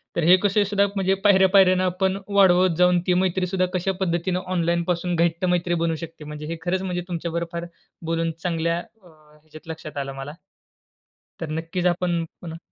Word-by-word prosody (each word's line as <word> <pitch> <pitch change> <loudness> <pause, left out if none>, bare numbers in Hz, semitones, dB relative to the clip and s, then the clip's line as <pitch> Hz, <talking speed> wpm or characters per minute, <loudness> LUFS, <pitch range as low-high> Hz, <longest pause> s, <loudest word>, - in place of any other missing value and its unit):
तर 170 - 0
हे 175 +3 +7
कसंहीसुद्धा 200 +1 +2
म्हणजे 190 -1 +1
पायऱ्या-पायऱ्याने 190 -2 +5
आपण 190 +1 0
वाढवत 185 -3 +4
जाऊन 180 0 +4
ती 180 - +4
मैत्रीसुद्धा 185 0 0
कशा 185 +1 0
पद्धतीने 180 0 0
ऑनलाईनपासून 170 0 0
घट्ट 170 +1 +1
मैत्री 180 -1 +1
बनू 165 -1 0
शकते. 165 -1 -9
म्हणजे 150 0 -7
हे 165 +1 -4
खरंच 185 +1 0
म्हणजे 180 -2 -3
तुमच्यावर 170 -1 -3
फार 170 -1 -4 0.4
बोलून 165 0 -1
चांगल्या, 170 -1 0
अ, 195 +1 -15
ह्याच्यात 155 0 -18
लक्षात 155 -2 -8
आलं 135 -1 -3
मला. 135 +2 -7 1.1
तर 165 - -5
नक्कीच 165 +3 -3
आपण 175 -1 0 0.2
पुन्हा 165 -2 -7
175 Hz, 160 wpm, -23 LUFS, 165-185 Hz, 1.1 s, हे